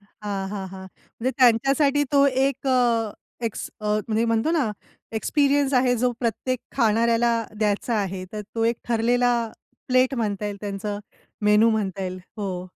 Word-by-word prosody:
हां, 200 -1 -6
हां, 195 -2 -4
हां, 190 0 -8 0.3
म्हणजे 255 +3 +1
त्यांच्यासाठी 275 +4 +4
तो 280 0 +6
एक 270 +1 0
अ, 240 -4 +2 0.3
एक्स 225 - -3
अ, 210 - -5 0.2
म्हणजे 220 +1 +1
म्हणतो 230 +5 +1
ना, 295 -10 +1 0.5
एक्सपिरियन्स 285 +1 +2
आहे, 250 -1 +4
जो 250 +2 +2
प्रत्येक 250 +2 -1 0.2
खाणाऱ्याला 230 0 +3 0.3
द्यायचा 215 +2 0
आहे. 190 -1 -4
तर 215 - -4
तो 225 -1 0
एक 230 0 +2
ठरलेला 245 +2 +2 0.6
प्लेट 255 +1 +3
म्हणता 210 -4 -2
येईल 205 -1 -3
त्यांचं. 205 0 -4 0.5
मेनू 210 +2 +5
म्हणता 200 -3 -1
येईल, 185 0 -4 0.2
हो. 185 -3 -3
230 Hz, 150 wpm, -24 LUFS, 205-255 Hz, 0.6 s, तो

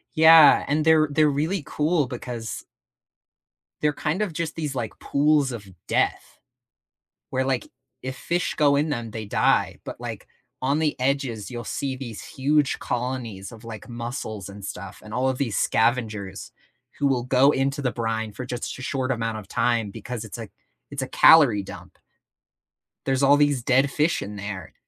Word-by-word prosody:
Yeah, 160 -1 +8
and 150 +2 +1
they're 155 -1 +5
they're 150 +1 +3
really 155 +4 -1
cool 150 -1 +1
because 120 -3 -6 1.2
they're 150 0 +2
kind 155 +7 -2
of 200 -6 -1
just 160 0 -3
these, 150 -4 -3
like, 115 -4 -4
pools 145 -1 +2
of 105 -4 -7 0.2
death, - - -1 0.9
where, 130 0 0
like, 130 -2 -1 0.3
if 130 0 -5
fish 175 +6 -1
go 145 -2 +4
in 150 +2 +1
them, 120 -6 -3
they 110 0 -5
die, 100 - +1
but, - - -7
like, - - -7 0.3
on 140 +3 +1
the 155 -2 0
edges, 130 -4 -1
you'll 120 0 -5
see 135 +2 -3
these 120 -5 -7
huge 145 +1 +1
colonies 120 -5 -4
of, 115 0 -13
like, 110 -2 -9
mussels 115 -4 -5
and 100 0 -10
stuff, 95 0 -7
and 105 0 -10
all 130 +1 +1
of 130 - -2
these 120 -7 -1
scavengers 110 -5 0 0.5
who 140 - +3
will 125 -3 +1
go 135 +2 +4
into 140 +1 0
the 125 - 0
brine 115 -2 -2
for 125 +5 -7
just 125 -1 -4
sh 130 - -8
short 130 0 -2
amount 115 -3 -2
of 105 - -9
time 115 -1 +1
because 115 +3 -6
it's 110 - -8
a 115 - -7 0.4
it's - - -4
a - - -3
calorie 125 -11 +6
dump. - - -11 1.1
There's 135 0 +1
all 140 +1 +6
these 145 -4 +2
dead 135 +3 +3
fish 155 +3 +1
in 105 +1 -6
there. 100 -1 -6
130 Hz, 175 wpm, -24 LUFS, 115-145 Hz, 1.2 s, Yeah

